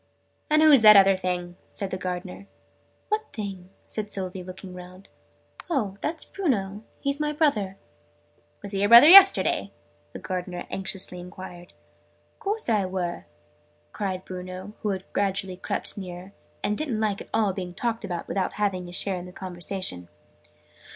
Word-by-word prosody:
"And 305 Hz, +1 st, +4 dB
who's 295 Hz, -5 st, +7 dB
that 215 Hz, -1 st, +9 dB
other 195 Hz, 0 st, +6 dB
thing?', 180 Hz, -1 st, -3 dB
said 195 Hz, -2 st, -6 dB
the -, -, -1 dB
Gardener. 180 Hz, +1 st, -6 dB, 0.6 s
"What 430 Hz, +1 st, -2 dB
thing?" 195 Hz, -4 st, -6 dB, 0.2 s
said 210 Hz, -1 st, -5 dB
Sylvie, 185 Hz, -1 st, -5 dB
looking 185 Hz, +1 st, -9 dB
round. 180 Hz, +1 st, -12 dB, 0.6 s
"Oh, 215 Hz, -, -1 dB
that's 315 Hz, +1 st, -3 dB
Bruno. 210 Hz, -, -2 dB, 0.2 s
He's 280 Hz, 0 st, -2 dB
my 300 Hz, 0 st, -1 dB
brother." 215 Hz, -11 st, +1 dB, 0.9 s
"Was 200 Hz, -, -2 dB
he 195 Hz, -, -1 dB
your 205 Hz, +1 st, +2 dB
brother 235 Hz, +5 st, +10 dB
yesterday?" 390 Hz, +2 st, +7 dB, 0.4 s
the -, -, -6 dB
Gardener 180 Hz, -1 st, -5 dB
anxiously 190 Hz, -1 st, -2 dB
enquired. 175 Hz, 0 st, -10 dB, 0.7 s
"Course 420 Hz, +3 st, -3 dB
I 210 Hz, -5 st, +2 dB
were!" 175 Hz, -, -4 dB, 0.6 s
cried 190 Hz, -2 st, -4 dB
Bruno, 185 Hz, +2 st, -7 dB
who 210 Hz, -, -1 dB
had 190 Hz, -1 st, -2 dB
gradually 195 Hz, -2 st, 0 dB
crept -, -, -3 dB
nearer, 185 Hz, 0 st, -8 dB, 0.3 s
and 210 Hz, -, 0 dB
didn't 265 Hz, -3 st, -2 dB
at 205 Hz, -2 st, -2 dB
all 220 Hz, -1 st, +2 dB
like 185 Hz, -, -3 dB
being 180 Hz, -2 st, -5 dB
talked 230 Hz, +1 st, -2 dB
about 175 Hz, -4 st, -4 dB
without 190 Hz, -2 st, -1 dB
having 190 Hz, -4 st, -1 dB
his 175 Hz, -, -6 dB
share 195 Hz, -1 st, +1 dB
in 180 Hz, 0 st, -7 dB
the -, -, -10 dB
conversation. 180 Hz, -, -4 dB
195 Hz, 155 wpm, -25 LUFS, 180-215 Hz, 0.9 s, brother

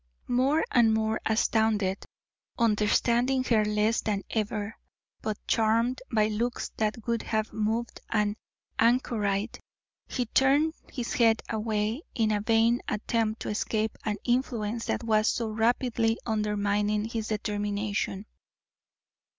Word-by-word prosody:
More 270 Hz, +6 st, +3 dB
and 225 Hz, -3 st, +4 dB
more 220 Hz, 0 st, 0 dB
astounded, 220 Hz, -3 st, +1 dB, 0.5 s
understanding 235 Hz, +3 st, +2 dB
her 225 Hz, -4 st, +3 dB
less 210 Hz, +2 st, +1 dB
than 205 Hz, -2 st, -1 dB
ever, 215 Hz, 0 st, -2 dB, 0.5 s
but 215 Hz, -1 st, -2 dB
charmed 230 Hz, +3 st, +2 dB
by 215 Hz, -2 st, +3 dB
looks 230 Hz, +3 st, -2 dB
that 215 Hz, +1 st, -1 dB
would 235 Hz, -1 st, 0 dB
have 215 Hz, -1 st, -2 dB
moved 220 Hz, +2 st, -2 dB
an 210 Hz, -1 st, +1 dB, 0.4 s
anchorite, 225 Hz, -3 st, +1 dB, 0.5 s
he 250 Hz, -, -2 dB
turned 275 Hz, +6 st, +3 dB, 0.2 s
his 245 Hz, -3 st, -4 dB
head 225 Hz, -2 st, +3 dB
away 220 Hz, +3 st, -1 dB
in 220 Hz, -2 st, +2 dB
a 205 Hz, -1 st, +1 dB
vain 225 Hz, +2 st, +3 dB
attempt 220 Hz, +1 st, -1 dB
to -, -, -4 dB
escape 215 Hz, +1 st, -1 dB
an 210 Hz, -2 st, -1 dB
influence 235 Hz, -3 st, -1 dB
that -, -, -1 dB
was 215 Hz, -1 st, +2 dB
so 230 Hz, -2 st, 0 dB
rapidly 230 Hz, +1 st, +1 dB
undermining 210 Hz, -1 st, 0 dB
his 225 Hz, -1 st, -3 dB
determination. 205 Hz, -1 st, -2 dB
220 Hz, 120 wpm, -28 LUFS, 210-235 Hz, 0.5 s, and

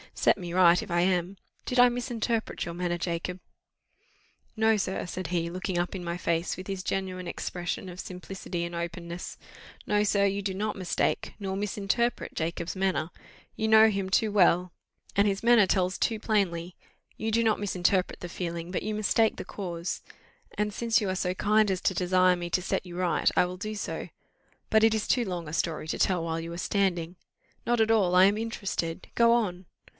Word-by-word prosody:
set -, -, +3 dB
me 175 Hz, -3 st, -6 dB
right, 175 Hz, -1 st, +5 dB
if 205 Hz, -, -9 dB
I 175 Hz, 0 st, +3 dB
am 180 Hz, +1 st, 0 dB, 0.3 s
did 250 Hz, -, 0 dB
I 245 Hz, -, +9 dB
misinterpret 240 Hz, -2 st, -2 dB
your 170 Hz, -, -5 dB
manner, 175 Hz, 0 st, -1 dB
Jacob?" 175 Hz, +1 st, -3 dB, 1.2 s
"No, 220 Hz, 0 st, +4 dB
sir," 190 Hz, -2 st, -2 dB
said 180 Hz, 0 st, -5 dB
he, 170 Hz, -1 st, -1 dB
looking 185 Hz, +1 st, -3 dB
up 175 Hz, +2 st, -1 dB
in 185 Hz, -, -5 dB
my 170 Hz, 0 st, -3 dB
face, 170 Hz, 0 st, -1 dB
with 185 Hz, -, -8 dB
his 195 Hz, -2 st, -4 dB
genuine 185 Hz, -2 st, -3 dB
expression 175 Hz, +2 st, -4 dB
of 180 Hz, 0 st, -9 dB
simplicity 180 Hz, -1 st, -5 dB
and 170 Hz, 0 st, -5 dB
openness; 170 Hz, 0 st, -5 dB, 0.5 s
"no, 210 Hz, 0 st, +2 dB
sir, 200 Hz, -1 st, +3 dB
you 200 Hz, 0 st, 0 dB
do 195 Hz, -1 st, -2 dB
not 210 Hz, +2 st, -2 dB
mistake, 185 Hz, -3 st, -1 dB
nor 190 Hz, -2 st, -3 dB
misinterpret 210 Hz, +4 st, -1 dB
Jacob's 165 Hz, +2 st, -3 dB
manner; 185 Hz, -5 st, 0 dB, 0.5 s
you 220 Hz, -, -1 dB
know 220 Hz, 0 st, +7 dB
him 195 Hz, -2 st, -2 dB
too 215 Hz, +2 st, +2 dB
well, 180 Hz, -2 st, +4 dB, 0.4 s
and 200 Hz, +1 st, +4 dB
his 195 Hz, +1 st, -1 dB
manner 235 Hz, -4 st, +6 dB
tells 185 Hz, 0 st, +1 dB
too 225 Hz, -2 st, 0 dB
plainly; 185 Hz, -6 st, 0 dB, 0.4 s
you 220 Hz, 0 st, -2 dB
do 230 Hz, +1 st, +2 dB
not 220 Hz, -2 st, +2 dB
misinterpret 185 Hz, -2 st, 0 dB
the 175 Hz, -, -7 dB
feeling, 170 Hz, -1 st, -4 dB
but 180 Hz, -, -2 dB
you 215 Hz, +2 st, -2 dB
mistake 215 Hz, +1 st, +2 dB
the -, -, -6 dB
cause; 175 Hz, -3 st, -4 dB, 0.6 s
and 210 Hz, 0 st, 0 dB
since 230 Hz, +1 st, +2 dB
you 205 Hz, -, -2 dB
are 185 Hz, -, -1 dB
so 180 Hz, -1 st, -1 dB
kind 215 Hz, +2 st, +3 dB
as 190 Hz, -1 st, 0 dB
to -, -, +1 dB
desire 185 Hz, 0 st, +3 dB
me 175 Hz, 0 st, -5 dB
to 185 Hz, -, +1 dB
set 190 Hz, -, -2 dB
you 175 Hz, -1 st, -8 dB
right, 180 Hz, -1 st, +2 dB
I -, -, +5 dB
will 180 Hz, +1 st, -6 dB
do 215 Hz, +3 st, -5 dB
so; 205 Hz, -, -4 dB, 0.6 s
but 220 Hz, 0 st, +4 dB
it 225 Hz, 0 st, +5 dB
is 220 Hz, -1 st, -1 dB
too 245 Hz, -2 st, +2 dB
long 175 Hz, -4 st, -4 dB
a 150 Hz, -, -7 dB
story 165 Hz, -2 st, -1 dB
to -, -, -3 dB
tell 180 Hz, -3 st, +2 dB
while 165 Hz, 0 st, -2 dB
you 165 Hz, +1 st, -6 dB
are -, -, -6 dB
standing." 175 Hz, -3 st, 0 dB, 0.5 s
"Not 240 Hz, 0 st, +1 dB
at 220 Hz, 0 st, +3 dB
all 190 Hz, -5 st, +3 dB
I 185 Hz, +1 st, +8 dB
am 200 Hz, +2 st, +3 dB
interested 195 Hz, -6 st, -3 dB
go 235 Hz, 0 st, +5 dB
on." 190 Hz, -6 st, 0 dB
185 Hz, 200 wpm, -28 LUFS, 175-210 Hz, 1.2 s, I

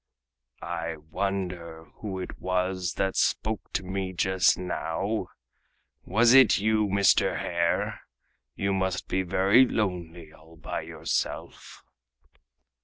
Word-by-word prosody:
"I 85 Hz, -1 st, -3 dB
wonder 85 Hz, 0 st, -4 dB
who 100 Hz, -3 st, -5 dB
it 90 Hz, -, -7 dB
was 90 Hz, -1 st, -1 dB
that 95 Hz, 0 st, -1 dB
spoke 110 Hz, -1 st, -1 dB
to 95 Hz, -, -1 dB
me 95 Hz, 0 st, -3 dB
just 95 Hz, 0 st, +3 dB
now! 90 Hz, +3 st, -2 dB, 0.8 s
Was 115 Hz, +5 st, +4 dB
it 135 Hz, -1 st, +7 dB
you, 110 Hz, 0 st, +2 dB
Mr. 100 Hz, -1 st, +3 dB
Hare? 85 Hz, -1 st, -1 dB, 0.5 s
You 100 Hz, 0 st, -1 dB
must 95 Hz, -1 st, -1 dB
be 95 Hz, -, 0 dB
very 95 Hz, +6 st, +4 dB
lonely 85 Hz, -7 st, -3 dB
all 80 Hz, +1 st, -18 dB
by 80 Hz, -, -5 dB
yourself!" -, -, -4 dB
95 Hz, 110 wpm, -27 LUFS, 85-100 Hz, 0.8 s, it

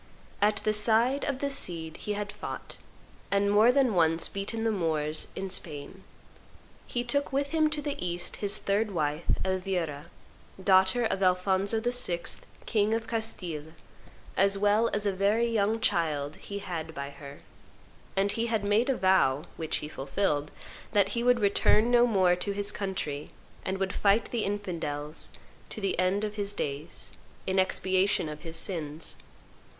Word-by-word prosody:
At 210 Hz, +1 st, +4 dB
the 215 Hz, -, +2 dB
side 230 Hz, +6 st, +3 dB
of 280 Hz, -3 st, -1 dB
the 280 Hz, 0 st, 0 dB
Cid 165 Hz, -, -2 dB
he 210 Hz, -, -3 dB
had 205 Hz, 0 st, -4 dB
fought, -, -, -7 dB, 0.5 s
and 200 Hz, 0 st, +2 dB
more 215 Hz, +4 st, +6 dB
than 255 Hz, -3 st, +3 dB
once 165 Hz, -2 st, +4 dB
beaten 200 Hz, +3 st, -3 dB
the 225 Hz, -, +2 dB
Moors 155 Hz, -5 st, 0 dB
in 190 Hz, -1 st, -4 dB
Spain. 165 Hz, +1 st, -5 dB, 0.8 s
He 240 Hz, -, -1 dB
took 285 Hz, +4 st, 0 dB
with 280 Hz, +1 st, 0 dB
him 315 Hz, -1 st, +2 dB
to 300 Hz, -1 st, -3 dB
the 285 Hz, -9 st, -3 dB
East 175 Hz, 0 st, -3 dB
his 205 Hz, 0 st, +3 dB
third 205 Hz, +2 st, 0 dB
wife, 155 Hz, -3 st, -2 dB, 0.2 s
Elvira, 180 Hz, -5 st, -2 dB, 0.6 s
daughter 190 Hz, +5 st, +4 dB
of 195 Hz, -, -1 dB
Alphonso 190 Hz, +3 st, +2 dB
VI., 240 Hz, -7 st, +1 dB, 0.4 s
king 215 Hz, 0 st, +2 dB
of 225 Hz, 0 st, -3 dB
Castile, 175 Hz, -9 st, -3 dB, 0.6 s
as 195 Hz, +1 st, +3 dB
well 210 Hz, +3 st, +3 dB
as 210 Hz, 0 st, -1 dB
a 200 Hz, -, +2 dB
very 200 Hz, +5 st, +2 dB
young 225 Hz, -1 st, +1 dB
child 155 Hz, -8 st, 0 dB
he 200 Hz, -, -7 dB
had 165 Hz, -5 st, -5 dB
by 140 Hz, 0 st, -5 dB
her, 140 Hz, 0 st, -11 dB, 0.7 s
and 195 Hz, +1 st, +2 dB
he 230 Hz, +2 st, -1 dB
had 220 Hz, -3 st, 0 dB
made 210 Hz, +5 st, +2 dB
a 265 Hz, -, +1 dB
vow, 165 Hz, -7 st, +3 dB
which 160 Hz, -1 st, -1 dB
he -, -, -5 dB
fulfilled, 150 Hz, +1 st, -1 dB, 0.4 s
that 200 Hz, -2 st, +4 dB
he 235 Hz, +3 st, -1 dB
would 245 Hz, -1 st, +4 dB
return 210 Hz, +3 st, +3 dB
no 240 Hz, 0 st, +6 dB
more 185 Hz, -5 st, +3 dB
to 200 Hz, +3 st, -1 dB
his 205 Hz, 0 st, -1 dB
country, 155 Hz, -7 st, -4 dB, 0.3 s
and 190 Hz, 0 st, -2 dB
would 190 Hz, -1 st, -2 dB
fight 205 Hz, +2 st, +2 dB
the 235 Hz, -3 st, -1 dB
infidels 165 Hz, -7 st, -3 dB, 0.4 s
to -, -, -6 dB
the 195 Hz, -3 st, -1 dB
end 185 Hz, +3 st, +2 dB
of 210 Hz, 0 st, -4 dB
his 205 Hz, 0 st, -1 dB
days, 145 Hz, +4 st, -5 dB, 0.3 s
in 190 Hz, 0 st, +1 dB
expiation 185 Hz, -1 st, +1 dB
of 150 Hz, 0 st, -7 dB
his 165 Hz, -1 st, -6 dB
sins. 160 Hz, -4 st, -3 dB
195 Hz, 165 wpm, -29 LUFS, 170-220 Hz, 0.8 s, more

